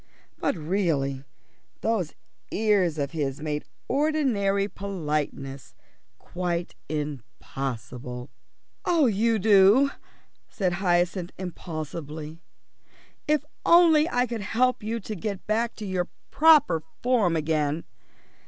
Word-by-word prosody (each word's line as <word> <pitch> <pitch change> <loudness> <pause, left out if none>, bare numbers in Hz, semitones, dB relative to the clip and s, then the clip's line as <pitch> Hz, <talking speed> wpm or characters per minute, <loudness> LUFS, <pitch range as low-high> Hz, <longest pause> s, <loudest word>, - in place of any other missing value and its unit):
But - - 0
really, 150 -6 -1 0.6
those 210 -8 -1 0.3
ears 200 -7 +2
of 140 -2 -2
his 145 -4 -2
made 150 -1 -3 0.2
ordinary 250 -9 +1
politeness 150 -9 -4 0.4
quite 175 -1 -3 0.2
impossible. 125 -4 -5 0.5
"Oh, 335 -4 +3
Udo," 220 +3 +5 0.6
said 185 -4 -1
Hyacinth 175 -1 +1
impulsively, 160 -3 -6 0.9
"if 300 -1 +2 0.2
only 335 -2 +6
I 245 -4 +2
could 235 -3 -4
help 250 +6 +1
you 225 +2 -2
to 215 +2 -5
get 200 +1 -4
back 225 +2 0
to 215 - -7
your 185 -2 -1 0.2
proper 305 - +5 0.2
form 230 -9 +3
again." 155 0 0
185 Hz, 95 wpm, -26 LUFS, 155-225 Hz, 0.9 s, only